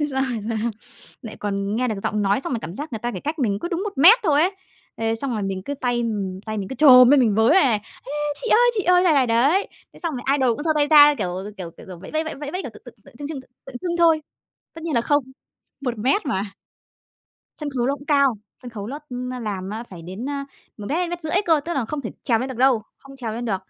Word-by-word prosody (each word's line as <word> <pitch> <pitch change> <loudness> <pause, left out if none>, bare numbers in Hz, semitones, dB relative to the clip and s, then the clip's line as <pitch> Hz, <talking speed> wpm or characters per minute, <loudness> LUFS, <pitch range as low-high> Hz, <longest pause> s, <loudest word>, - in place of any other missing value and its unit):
Thế 295 - +1
xong 265 0 0
rồi 235 -5 -3
là 225 +1 -3 0.7
lại 225 - -8
còn 200 0 -2
nghe 250 0 0
được 220 - -1
giọng 210 -1 0
nói, 200 +5 +2
xong 265 - -5
rồi 230 - -2
cảm 170 - -7
giác 295 +1 -7
người 220 - -3
ta 240 +2 -2
chỉ - - -5
cách 305 +2 -4
mình 205 -6 0
cứ - - -3
đúng 350 0 -2
1 420 - -4
mét 380 - +8
thôi 300 -5 +3
ấy. 375 +3 +1 0.4
Thế 225 0 0
xong 255 +3 -4
rồi 215 -3 -2
mình 190 -1 -3
cứ 285 - -3
tay, 245 -3 -1
ừm, 200 -5 -3
tay 215 -1 -3
mình 195 - -4
cứ 265 - -5
chồm 255 -3 +8
lên, 285 -2 +6
mình 220 -5 +3
với 220 +2 +3
vầy 355 0 +6
này: 225 -6 +2
"A, - - -19 0.4
chị 485 - -4
ơi, 485 +2 +5
chị 400 - 0
ơi!" 360 0 +4
này 340 -4 +4
này 265 -3 +3
đấy, 275 - +3 0.3
thế - - -15
xong 330 -3 -1
rồi 245 - -6
idol 250 -4 +2
cũng 295 - -6
giơ 320 - +2
tay 295 -1 +2
ra, 295 -1 +8
kiểu 180 - -2 0.3
kiểu 175 -3 -7
kiểu - - -12
kiểu, 180 -2 -9
vẫy 190 - -11
vẫy 315 +1 0
vẫy 315 - -6
vẫy 290 +1 -6
vẫy, 365 - -3
kiểu, - - -5
tượng - - -15
tượng - - -12
tượng - - -17
trưng 290 - -5
trưng 295 -4 -6
tượng 255 - -26
tượng 270 -2 -11
trưng 345 -1 -2
thôi 330 -2 +4 0.5
tất 325 - -10
nhiên 330 - -3
là 235 - +3
không, 290 +4 +2 0.6
1 245 -4 -3
mét 275 - +1
mà. 200 -7 -1 1.2
Sân 300 - -3
khấu 250 -3 -1
nó 275 - +1
cũng 285 +1 -13
cao, 280 -4 +3 0.3
sân 245 - -8
khấu 210 -3 -7
ló 280 +5 -5
nó 250 0 -4
làm 200 -4 -4
á 220 +2 -5
phải 175 -3 -10
đến, 190 +10 -6
a, 280 -1 -3 0.3
1 205 -2 -8
mét 300 - 0
hay 355 -1 0
mét 350 -1 -5
rưỡi 315 - -4
cơ, 325 -3 +4
tức 345 - -3
là 270 - 0
không 290 +6 -4
thể 225 - -5
trèo 230 -4 +2
lên 255 - -3
được 260 - -6
đâu, 255 -3 +3 0.2
không 275 0 -14
trèo 235 -4 -4
lên 235 +2 -4
được, 205 -4 0
260 Hz, 290 wpm, -22 LUFS, 220-300 Hz, 1.2 s, mét